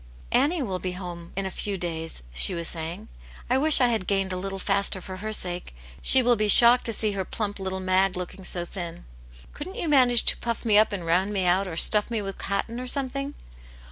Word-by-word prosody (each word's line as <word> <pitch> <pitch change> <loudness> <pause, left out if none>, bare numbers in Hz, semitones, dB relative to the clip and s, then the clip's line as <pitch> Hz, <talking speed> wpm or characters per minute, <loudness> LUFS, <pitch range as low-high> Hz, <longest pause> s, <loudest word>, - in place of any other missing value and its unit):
" - - -22
Annie 315 0 -1
will 190 -6 -4
be 185 0 -4
at - - -8
home 175 -2 -9
in 195 0 -3
a 190 - -4
few 200 +1 -3
days," 165 - -5
she - - +4
was 170 -1 -4
saying. 170 +6 -6 0.2
" - - -19
I 260 - +3
wish 310 +2 +6
I 250 -2 +3
had 220 -6 -2
gained 195 -1 -1
a - - -3
little 195 +1 -5
faster 200 0 -1
for 185 +1 -9
her 215 +3 -6
sake. 180 - -3 0.3
She 260 - +5
will 240 0 +3
be 215 -1 0
shocked 235 +4 +8
to 230 - -3
see 215 0 0
her 195 -1 -3
plump 205 +1 -5
little 190 0 -4
Mag 185 0 +1
looking 185 +1 -7
so 175 -1 -1
thin. 175 -1 -8 0.5
Couldn't 365 +7 -8
you 405 -8 -4
manage 250 -5 +3
to - - +3
pufF 235 0 -5
me 215 -2 +2
up 215 +1 +4
and 190 -4 -5
round 180 +5 +1
me 190 -2 -1
out, 185 +2 +1
or 165 -3 -7
stuff 210 +5 +5
me 230 -2 -2
with 195 -2 -7
cotton, 225 +4 -3
or 255 - -6
something?" 275 +1 -3
195 Hz, 240 wpm, -24 LUFS, 180-235 Hz, 0.5 s, shocked